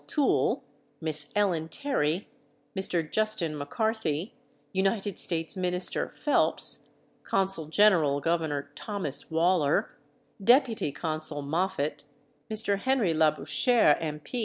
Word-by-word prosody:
Toole, 290 -3 +1 0.4
Miss 155 -2 -1
Ellen 175 -6 +1
Terry, 175 - -1 0.5
Mr. 175 -4 -1
Justin 215 -5 -1
McCarthy, 175 +2 -2 0.4
United 195 +1 -1
States 165 0 -2
Minister 180 -1 0
Phelps, 295 - +1 0.3
Consul 190 -5 0
General 160 -6 +4
Gov. 155 -2 -1
Thomas 200 -10 -3
Waller, 160 -2 +2 0.5
Deputy 240 - +3
Consul 155 -1 -2
Moffat, 150 -2 -2 0.4
Mr. 215 -2 +3
Henry 245 -7 +1
Labouchere, 160 - +4
M. 150 -2 -4
170 Hz, 95 wpm, -28 LUFS, 155-205 Hz, 0.5 s, General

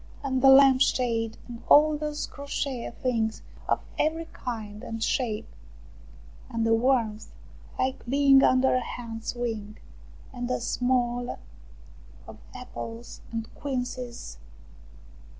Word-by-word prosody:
And 260 -2 0
the 270 - +7
lamp 265 -1 +7
shade, 230 -4 +1
and 235 -1 -9
all 305 +1 +7
those 300 0 -3
crochet 280 -3 -4
things 225 -3 0 0.2
of - - +1 0.2
every 325 +2 +1
kind 215 -4 -6
and 225 0 -4
shape! 225 -5 -1 1.0
And 230 -1 -1
the 225 - +3
warmth, 225 -3 +1 0.5
like 260 +1 -1
being 275 +1 +5
under 255 0 +4
a 255 - +3
hen's 230 -2 -6
wing, 220 -3 -4 0.6
and 245 -1 -4
a 255 - 0
smell 245 0 0 0.9
of - - -11 0.2
apples 240 -2 -8
and 225 -1 -4
quinces 250 - -5
245 Hz, 115 wpm, -27 LUFS, 225-265 Hz, 1.0 s, the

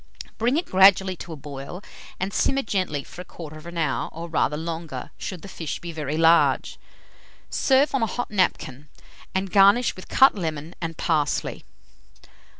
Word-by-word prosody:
Bring 240 +6 +2
it 345 - -1
gradually 190 0 +5
to 170 - -9
a - - -5
boil, 140 +5 -8 0.4
and 190 +1 -2
simmer 275 0 +1
gently 185 -9 -2
for 180 - -10
1/4 165 0 -10
hour, 160 -2 -1
or 165 +2 -7
rather 150 -2 0
longer, 160 -5 -5
should 185 -4 -7
the - - -8
fish 165 -5 -5
be 170 - -7
very 155 -2 -3
large. 165 +1 +3 0.7
Serve 270 +2 +3
on 270 - +1
a 225 - +2
hot 245 +2 -4
napkin, 150 -8 -1 0.5
and 190 0 -1
garnish 200 +5 +5
with 185 - -11
cut 265 0 +6
lemon 160 -4 -4
and 165 -1 -4
parsley. 155 -3 -1
170 Hz, 155 wpm, -24 LUFS, 155-195 Hz, 0.7 s, cut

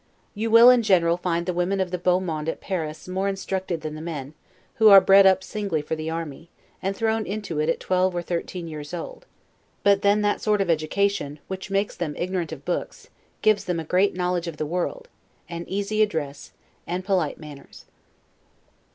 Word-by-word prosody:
You 225 +2 -2
will 230 +2 +9
in 250 -1 +4
general 175 -6 +3
find 175 -1 -2
the 180 - -1
women 180 +3 0
of 185 -2 -1
the 180 - -2
beau 180 +1 +2
monde 160 -4 -3
at - - -4
Paris 160 -5 -4
more 190 +2 -1
instructed 190 -3 -3
than 155 -1 -5
the 155 - -7
men, 150 -4 -6 0.4
who 220 -1 +7
are 200 -1 +11
bred 195 0 +6
up 190 0 +3
singly 190 -7 -3
for 155 - -3
the 155 0 -4
army, 165 0 -6 0.3
and 195 +1 -2
thrown 220 0 0
into 200 -6 -4
it 155 +1 +1
at - - 0
twelve 185 0 +1
or 175 - -2
thirteen 175 0 -4
years 150 0 -7
old; - - -8 0.6
but 200 -1 +4
then 205 +1 +3
that 205 0 0
sort 210 -1 +1
of 190 -3 +1
education, 160 -1 0
which 190 +1 -6
makes 195 +1 -1
them 160 -4 -4
ignorant 180 -2 -2
of 145 -3 -9
books, 175 - -4 0.3
gives 215 -1 +3
them 175 -2 -1
a - - -4
great 185 +5 +2
knowledge 180 -1 -1
of 165 -2 -6
the 155 - -2
world, 180 - -3 0.4
an 170 0 -6
easy 205 +2 -1
address, 155 -9 -2 0.4
and 180 +2 -3
polite 185 -7 0
manners. 150 -3 -12
180 Hz, 195 wpm, -24 LUFS, 165-200 Hz, 0.6 s, are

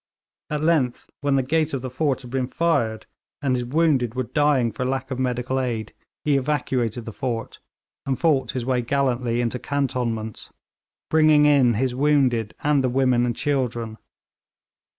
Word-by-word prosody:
At 150 0 -2
length, 155 -7 +1
when 140 -1 +1
the 135 - +2
gate 155 +2 0
of 130 - -5
the 130 - -3
fort 135 0 -1
had 120 - -10
been 130 -1 -1
fired, 120 -9 0 0.3
and 135 -3 0
his 125 - -1
wounded 130 -3 +1
were 130 - 0
dying 135 -2 +2
for 130 - -4
lack 130 +1 -2
of 130 - -3
medical 125 +1 -1
aid, 115 -4 -3 0.3
he 145 -2 +3
evacuated 125 -5 -1
the 115 - -7
fort, 120 -3 -4 0.5
and 135 -2 0
fought 155 -5 +1
his 125 -2 -3
way 125 -1 +1
gallantly 125 -2 0
into 120 +1 -2
cantonments, 120 -6 -2 0.6
bringing 155 -1 +5
in 135 -6 +4
his 125 +3 0
wounded 130 -5 +1
and 145 -2 +3
the 130 - +2
women 125 -1 +2
and 120 - -1
children. 120 -6 -2
130 Hz, 165 wpm, -23 LUFS, 120-145 Hz, 0.6 s, bringing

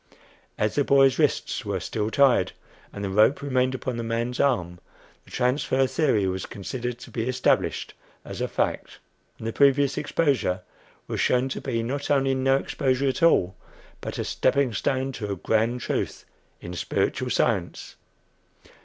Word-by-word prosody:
As 105 0 0
the 145 - +2
boy's 135 0 +4
wrists 150 -6 0
were 100 -3 -2
still 105 +4 -2
tied, 135 +1 +3 0.4
and 100 - -7
the 100 - -2
rope 110 +8 +3
remained 130 -2 +1
upon 130 -1 -4
the 115 - -3
man's 115 +2 -2
arm, 90 -11 +1 0.5
the - - -18
"transfer" 130 +1 +1
theory 130 -8 +1
was 95 0 -2
considered 120 +4 -5
to 125 - -12
be 115 +1 -2
established 130 0 0 0.3
as - - -7
a - - 0
fact, - - -2 0.4
and - - -9
the 115 - -2
previous 140 0 +3
exposure 135 - 0 0.6
shown 125 +1 +2
to - - -4
be 115 -4 -2
not 140 +4 -3
only 135 -2 +2
no 135 0 +2
exposure 135 0 0
at 135 - -3
all, 95 - +4 0.5
but - - -5
a - - -1
"stepping 140 -4 +1
stone 130 +5 -1
to 105 -5 -5
a - - -1
grand 115 +6 0
truth - - -3 0.4
in 90 - -7
spiritual 90 - -1
science." - - -1
125 Hz, 160 wpm, -25 LUFS, 110-135 Hz, 0.6 s, boy's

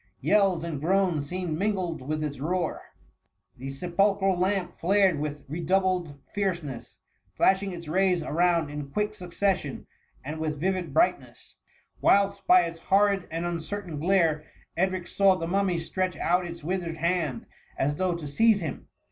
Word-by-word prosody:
Yells 195 -5 +3
and 160 -5 -4
groans 175 -4 +1
seemed 180 -3 -3
mingled 185 -6 -1
with 155 +3 -3
its 145 -3 -4
roar$ 170 +3 -1 0.4
— 95 -1 -44
the 135 +2 -5
sepulchral 190 +6 +1
lamp 185 0 -1
flared 190 -3 +3
with 150 -1 -4
redoubled 175 -1 0
fierceness, 175 - -3 0.4
flashing 195 +1 +2
its 170 -2 -8
rays 180 +1 +2
around 170 -1 +1
in 145 -1 -6
quick 210 +7 -1
succession, 180 -5 -2 0.4
and 155 +3 -5
with 155 -2 -2
vivid 185 0 -1
brightness; 340 +2 0 0.5
whilst 200 0 +3
by 180 0 +7
its 165 -1 -4
horrid 195 +1 +2
and 165 +1 -3
uncertain 175 -1 -4
glare, 165 -3 +2 0.3
Edric 185 0 0
saw 195 +1 +3
the 165 - -3
Mummy 190 0 +1
stretch 185 +2 -2
out 180 +1 +1
its 170 -3 -8
withered 170 -1 -3
hand 165 -7 -1 0.3
as 145 +2 0
though 185 -2 0
to 170 -3 -7
seize 215 +9 +3
him. 160 -6 -5
175 Hz, 150 wpm, -27 LUFS, 155-190 Hz, 0.5 s, by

